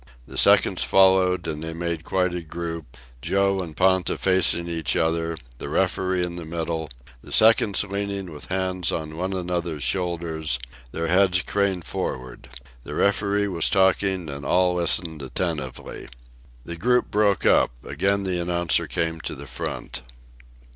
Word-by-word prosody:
The - - -12
seconds - - +4
followed, 95 -2 +3
and 75 -1 -4
they 80 0 -5
made 85 -1 -3
quite 90 0 0
a 90 - -3
group, 80 -5 -7 0.2
Joe 100 +5 +1
and 80 -4 -8
Ponta 95 -1 +2
facing 90 -2 +4
each 80 -3 -1
other, 80 0 0 0.2
the - - -6
referee 95 -1 0
in 85 0 -6
the 85 - -6
middle, 80 -1 -4 0.3
the - - -13
seconds 110 -3 +4
leaning 100 -3 -4
with 75 - -10
hands 95 -1 -1
on 80 -1 -4
one 90 +3 -3
another's 85 -5 -3
shoulders, 80 -2 -1 0.3
their 80 - -3
heads 90 +1 +3
craned 100 -4 0
forward. 65 -3 -5 0.3
The 75 +4 -7
referee 100 0 +1
was 85 -4 +2
talking, 95 -2 +2
and 70 -1 -6
all 90 +5 +2
listened 85 -2 +2
attentively. 70 -1 -4 0.6
The 85 - -6
group 125 +7 +1
broke 105 -2 +2
up. - - +4 0.2
Again 100 +1 0
the 90 -2 -1
announcer 85 -1 0
came 80 -1 -2
to - - -5
the 70 - -9
front. 65 -1 -6
85 Hz, 150 wpm, -24 LUFS, 80-95 Hz, 0.6 s, seconds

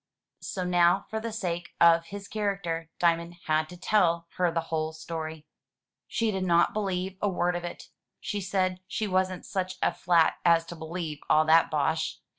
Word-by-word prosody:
So 185 - -4
now, 180 +1 +3
for 220 - -1
the 230 +1 -4
sake 175 -5 -4
of 165 0 +5
his 200 +2 -8
character. 195 -6 -2
Diamond 170 0 +1
had 155 0 +1
to 180 - -10
tell 170 -3 +2
her 180 -1 +3
the 165 - 0
whole 155 0 -1
story. 160 -1 -6 0.6
She 230 -3 0
did 190 -2 -2
not 170 -2 +3
believe 190 -2 -2
a 205 - +2
word 180 -1 0
of 175 - -3
it. 175 - -8 0.3
She 205 -1 -3
said 185 -1 0
she 215 - -2
wasn't 185 -2 0
such 185 -1 -3
a - - +1
flat 170 -2 +3
as 170 -1 +4
to 170 - -8
believe 160 -2 -5
all 155 +1 +5
that 160 +1 +5
bosh. 160 +1 0
175 Hz, 180 wpm, -28 LUFS, 165-190 Hz, 0.6 s, of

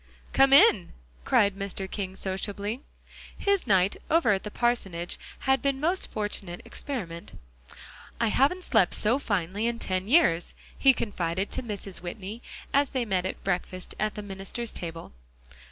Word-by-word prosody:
"Come 270 0 +5
in," 275 - +6 0.3
cried 200 -1 +4
Mr. 195 -1 -4
King 190 -1 -4
sociably. 200 +5 -3 0.6
His 400 -2 +1
night 190 -1 +3
over 315 -9 +4
at 195 -1 +1
the 210 - -6
parsonage 195 -8 -1 0.2
had 265 -2 +2
been 275 -1 +1
a - - -9
most 345 +6 0
fortunate 200 -4 -4
experiment. 180 -12 -6 0.8
"I 230 -1 +2
haven't 290 +11 +2
slept 220 - +3
so 235 +6 +2
finely 200 -1 -1
in 235 0 -1
ten 185 -3 -2
years," 215 - +3 0.2
he 270 - +6
confided 190 -5 -2
to - - -1
Mrs. 205 -5 -5
Whitney 200 +5 -6 0.3
as 280 -1 +3
they 255 -3 -1
met 190 -3 0
at - - -7
breakfast 185 -1 -3
at 215 0 0
the 210 - -5
minister's 195 +4 -5
table. 165 -1 -5
205 Hz, 155 wpm, -27 LUFS, 185-245 Hz, 0.8 s, in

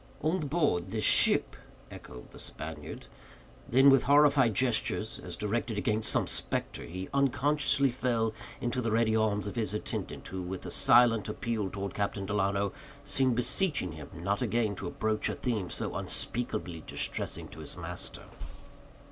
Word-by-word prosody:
"On 160 +5 +1
board 145 - 0
this 110 +1 -2
ship?" - - +4 0.4
echoed 60 -1 -11
the - - -13
Spaniard. 75 -2 -6 0.6
Then, 135 +3 +7
with 135 -2 +4
horrified 140 -5 +5
gestures, 115 -3 0
as 90 -1 -5
directed 110 +2 -2
against 105 +1 +1
some - - +2
spectre, - - -1
he 95 +3 -6
unconsciously 140 0 +2
fell 115 -3 0 0.3
into 120 +1 -1
the 115 - -1
ready 110 0 +2
arms 105 -2 +1
of 100 - -5
his 110 -3 -1
attendant, 105 - -5
who, 95 0 -4
with 90 +1 -6
a - - -5
silent 115 -4 +4
appeal 105 -2 -2
toward 100 0 -5
Captain 100 -1 -2
Delano, 100 -1 0 0.3
seemed 130 -3 +1
beseeching 125 - +1
him 75 -1 -9
not 100 +5 -2
again 115 -3 +1
to 90 - -4
broach 110 +2 -1
a - - -2
theme 110 -8 -2
so - - -3
unspeakably 90 -8 -3
distressing - - -1
to - - -11
his - - -3
master. - - -5
110 Hz, 155 wpm, -30 LUFS, 100-125 Hz, 0.6 s, Then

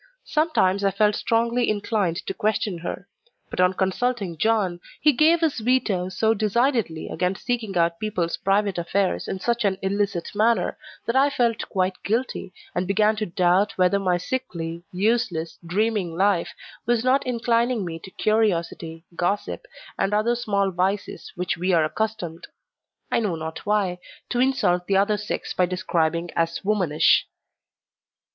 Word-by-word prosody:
Sometimes 205 - +2
I 200 - +4
felt 210 +2 +2
strongly 235 +1 +1
inclined 205 -4 -1
to - - -3
question 210 -4 -1
her; 170 - -6 0.4
but - - -5
on 180 +1 +4
consulting 195 0 -1
John, 200 -2 +1 0.2
he 300 - +5
gave 320 +5 +4
his 315 -6 +1
veto 220 -6 +1
so 220 +4 +2
decidedly 225 - 0
against 180 +3 -2
seeking 230 -6 -1
out 170 0 +2
people's 185 -6 -1
private 195 -1 +1
affairs 185 +3 0
in 190 - -3
such 235 +4 0
an 195 -2 +1
illicit 200 -2 -1
manner 225 +3 +2 0.3
that 230 - -1
I 275 +2 +5
felt 235 -5 0
quite 185 -1 -1
guilty, 230 -2 -2 0.2
and 180 +1 -1
began 210 +2 +3
to 215 - -2
doubt 180 +3 +2
whether 185 +2 +3
my 180 -2 +1
sickly, 170 -6 -4
useless, 200 -4 0
dreaming 190 -1 0
life, 195 -2 +2 0.4
was 240 -1 +2
not 260 +2 +3
inclining 235 -2 +1
me 165 -1 -5
to 190 - -11
curiosity, 170 -6 0
gossip, 200 - -2 0.3
and 205 +2 +1
other 225 +3 +2
small 200 -4 0
vices 190 +3 -2
which 180 -2 -2
we 180 +2 0
are 165 -2 +4
accustomed 175 -3 -3 0.6
I - - +3
know 205 -7 -1
not 160 +3 -6
why 200 -4 +1 0.3
to 245 - -1
insult 215 -9 +2
the 195 - +3
other 205 +2 +2
sex 210 +1 -4
by 180 - +2
describing 170 -2 -1
as 165 +2 -1
"womanish." 180 -8 +3
200 Hz, 150 wpm, -24 LUFS, 180-225 Hz, 0.6 s, he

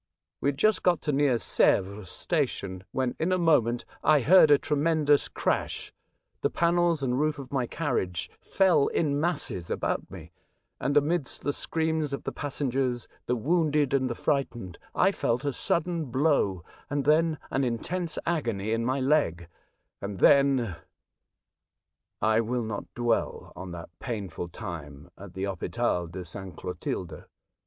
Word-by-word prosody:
We - - -1
had 140 -1 0
just 215 +8 +3
got 175 -2 +3
to 150 - 0
near 140 -3 +3
Sevres 100 -3 +1
station, 100 - -2
when, 130 -2 -1
in 170 +3 0
a 185 - +3
moment, 125 -9 +2 0.2
I 150 -2 +5
heard 160 +4 +7
a 145 - +7
tremen 155 +2 0
dous 145 -1 +4
crash, - - -2 0.5
the - - +2
panels 170 -3 +2
and 125 0 0
roof 155 0 +1
of 135 -2 -9
my 130 -4 0
carriage 105 - -2
fell 185 -7 +3
in 145 -2 0
masses 150 - -1
about - - -2
me, 80 +2 -10 0.5
and 145 +2 +1
amidst 150 -1 0
the 145 - 0
screams 160 -2 0
of 140 - -4
the - - -3
passengers, 130 -4 -2 0.2
the 125 - +1
wounded 150 +1 +1
and 130 -2 +2
the 120 - -3
fright 140 0 +1
ened, 95 -8 -9 0.2
I 190 - +4
felt 125 -7 -1
a 140 - 0
sudden 170 +4 0
blow 130 - +1 0.3
and 145 -1 -1
then 155 +1 +3
an 135 - +1
intense 160 +8 -2
agony 115 -11 -1
in 115 +1 0
my 130 +3 0
leg, 130 - +1 0.5
and 100 -1 -5
then 135 -6 +4 1.5
I 110 +1 +4
will 120 +1 -1
not 110 -2 -5
dwell 120 -2 -1
on 90 +1 -7
that 85 -1 -8
painful 95 -8 -5
time 80 -5 -8
at 95 -2 -12
the 95 - -3
Hopital 100 -1 -1
de 90 +3 -7
S. 85 -2 -10 0.2
Clotilde. 90 -1 -5
135 Hz, 155 wpm, -27 LUFS, 105-150 Hz, 1.5 s, heard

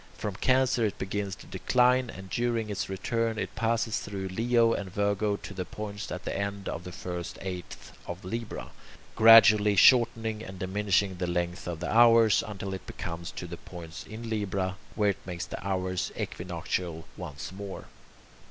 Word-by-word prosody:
From 100 -3 -4
Cancer 125 +2 +3
it 105 -1 0
begins 100 0 -3
to - - -14
decline, 125 0 +2
and 95 -2 -8
during 115 -3 0
its 100 -1 -3
return 115 +3 -1
it - - -3
passes 115 -1 0
through 95 -2 -5
Leo 115 +3 +3
and 95 -3 -4
Virgo 100 +1 +1
to 100 - -9
the 95 -1 -3
points 105 +2 -6
at 90 - -5
the - - -2
end 100 0 -3
of 85 - -4
the 90 - -6
first 90 -1 -5
eighth 90 -2 -7
of 90 +1 -6
Libra, 115 +4 -5 0.4
gradually 110 -2 +8
shortening 115 0 +5
and 95 -3 -8
diminishing 95 0 +1
the 90 0 -2
length 85 0 -2
of 85 -1 -4
the 90 - -2
hours, 115 -2 +6
until 100 -2 -5
it 95 - -8
comes 85 0 -5
to - - -7
the 85 0 -7
points 85 -2 -9
in 115 +2 -7
Libra, 100 -4 -1 0.2
where 105 -1 +3
it 100 - -10
makes 90 -2 -4
the - - -7
hours 95 -2 -1
equinoctial 85 -3 -3
once 75 -4 -7
more. 100 0 -7
100 Hz, 170 wpm, -29 LUFS, 90-110 Hz, 0.4 s, gradually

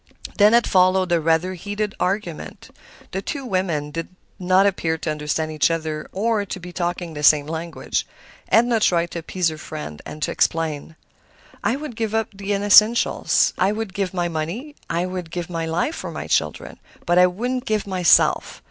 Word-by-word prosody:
Then 210 +2 +6
had 235 0 +5
followed 185 -1 +3
a 170 -1 +3
rather 165 +3 +1
heated 205 +3 -4
argument; 180 -3 -4 0.4
the 190 - -3
two 275 +5 -5
women 175 -9 -1
did 165 +2 -4 0.3
not 185 +1 +3
appear 165 -5 0
to 155 - -3
understand 155 +1 -2
each 155 +1 +2
other 155 -2 -3
or 215 +1 0
to 190 -1 -6
be 180 0 -9
talking 175 -1 -3
the 150 - -6
same 150 0 +5
language. 160 +1 -3 0.4
Edna 235 0 +4
tried 170 -4 +2
to 170 - -4
appease 170 +1 -1
her 155 -1 -8
friend, 150 - -7 0.2
to - - -1
explain. 160 -1 -1 0.7
"I 235 - +1
would 285 -4 -7
give 225 -1 -2
up 225 -1 0
the 200 +1 -5
unessential; 205 +3 +4 0.3
I 190 +2 +3
would 215 -2 -4
give 195 -1 -2
my 175 -2 -1
money, 170 - -4
I 170 +2 0
would 180 -2 -5
give 175 +1 -5
my 165 -1 -2
life 175 - -1
for - - -5
my - - -6
children; - - -1 0.3
but 175 +1 +3
I 180 - +7
wouldn't 245 +8 -3
give 215 -5 0
myself. 185 -4 +3
180 Hz, 180 wpm, -22 LUFS, 165-205 Hz, 0.7 s, I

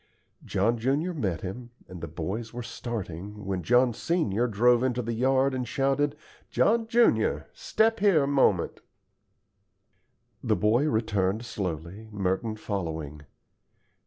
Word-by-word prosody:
John 110 +4 0
junior 145 +9 0
met 95 - -2
him, 120 +6 -6 0.2
and 90 -2 -10
the - - -4
boys 110 +4 -4
were 120 - -4
starting, 105 -4 -6
when 95 -2 -2
John 125 +6 +3
senior 125 - 0
drove 120 +2 +3
into 125 -1 0
the 115 +1 -3
yard 130 +3 +2
and 125 -1 -2
shouted, 140 +3 +1 0.3
"John 225 +1 +2
junior, 235 0 +3
step 225 - +1
here 190 -7 +4
a - - 0
moment." 130 -11 +2 1.6
The - - +2
boy 120 +8 +2
returned 110 -1 0
slowly, 95 +1 -5
Merton 100 +2 -1
following. 80 -8 -5
115 Hz, 130 wpm, -27 LUFS, 95-135 Hz, 1.6 s, here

